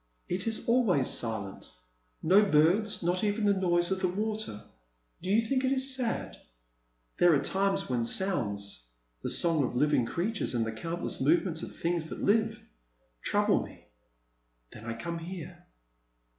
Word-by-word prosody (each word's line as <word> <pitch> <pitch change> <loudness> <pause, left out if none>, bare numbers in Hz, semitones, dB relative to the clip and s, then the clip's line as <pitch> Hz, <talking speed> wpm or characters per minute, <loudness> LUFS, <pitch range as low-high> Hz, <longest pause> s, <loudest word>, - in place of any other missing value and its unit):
It 185 +4 -3
is 225 - +1
always 225 - +3
silent 110 -4 +1 0.3
— - - -43
no 190 +6 +5
birds, 190 +5 +2
not 180 +3 0
even 210 +1 0
the 205 - +4
noise 175 -2 +1
of 190 - 0
the 185 - +1
water. 210 - -3 0.6
Do 185 - -5
you 220 +3 +3
think 265 0 0
it 260 - +1
is 265 0 +3
sad? 245 -3 -3 0.8
There 175 -2 +6
are 140 - 0
times 195 +4 0
when 125 -2 -1
sounds, 100 - -1 0.2
— - - -45
the - - -3
song 165 -4 +2
of 125 - -3
living 140 -2 +2
creatures 200 - -2
and 115 -1 +1
the 115 - -3
countless 165 +10 -4
movements 165 +3 +1
of - - -8
things 170 -1 -1
that - - -7
live, 220 +1 +2 0.6
trouble - - +2
me. - - -15 0.8
Then 110 - -11
I 115 0 -4
come 170 +9 -5
here. 175 0 -9
175 Hz, 165 wpm, -29 LUFS, 135-205 Hz, 0.8 s, There